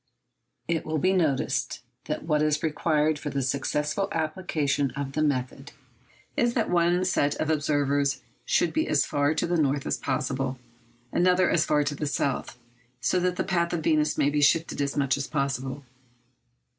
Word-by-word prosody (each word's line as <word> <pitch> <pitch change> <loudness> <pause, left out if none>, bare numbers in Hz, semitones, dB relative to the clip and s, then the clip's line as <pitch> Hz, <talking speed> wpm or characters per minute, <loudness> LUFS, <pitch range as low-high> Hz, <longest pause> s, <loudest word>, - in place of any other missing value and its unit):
It 165 -2 0
will 155 0 -2
be 185 +5 +2
noticed 155 -8 0 0.2
that - - -3
what 150 -2 +1
is 150 0 +1
required 155 -1 +1
for 150 - -4
the 140 -1 -2
successful 150 +8 -1
application 155 -4 -1
of 140 -1 -3
the 155 - -1
method 135 -1 -2 0.6
is 240 -5 +1
that 225 -6 0
one 175 +1 +2
set 145 -5 +1
of 155 - -1
observers 145 -2 +1 0.2
should - - +1
be 315 - 0
as 145 -2 +2
far 145 +2 +1
to - - 0
the 175 0 0
north 140 -1 0
as - - -1
possible, 135 0 -2 0.5
another 180 0 +3
as 160 - +3
far 150 -1 +3
to 145 0 -2
the 150 +1 -3
south, 135 -3 -2 0.4
so 130 +9 +1
that 180 0 0
the - - -1
path 170 -2 0
of 165 -2 -2
Venus 155 -1 +2
may 145 - +2
be 150 0 +1
shifted 160 +1 +2
as 140 +1 -2
much 140 -1 +2
as 140 - -3
possible. 135 -1 -2
150 Hz, 175 wpm, -26 LUFS, 140-170 Hz, 0.6 s, another